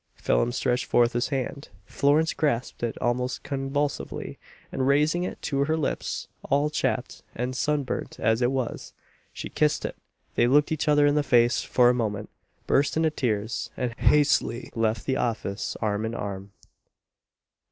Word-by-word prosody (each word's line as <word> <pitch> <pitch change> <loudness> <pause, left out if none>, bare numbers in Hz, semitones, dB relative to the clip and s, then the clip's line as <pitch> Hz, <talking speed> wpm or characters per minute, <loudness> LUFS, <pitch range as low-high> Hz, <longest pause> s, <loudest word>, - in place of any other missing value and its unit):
Phelim - - +1
stretched 125 0 0
forth 120 0 +3
his 120 +1 0
hand 140 +1 -4 0.2
Florence 150 +3 +2
grasped 135 -5 -1
it 120 -1 -2
almost 125 +1 -1
convulsively, 140 +1 -3 0.3
and 130 0 -1
raising 150 +5 +3
it - - -5
to 140 -2 0
her 160 +2 0
lips, 150 - -2 0.2
all 145 +2 +2
chapped 125 -4 -2
and 125 +2 -3
sun 150 +2 +1
burnt 130 - -5
as 110 +2 +2
it 120 +1 +3
was, 130 -3 -3 0.4
she - - -6
kissed 150 -1 +1
it - - -4 0.4
they 120 - +3
looked 145 +4 +4
each 155 0 -1
other 145 -1 +5
in 145 - +4
the 150 - +3
face 120 -3 +3
for 125 -1 +3
a 125 - +5
moment 105 -4 -2 0.3
burst 140 +3 +2
into 160 -1 +2
tears, 110 -6 -2
and 125 -2 -2
hastily 140 -4 +2
left 115 0 0
the 130 -1 0
office 110 -5 -2
arm 105 0 0
in 110 +1 -3
arm. 100 -1 -5
130 Hz, 165 wpm, -26 LUFS, 120-145 Hz, 0.4 s, other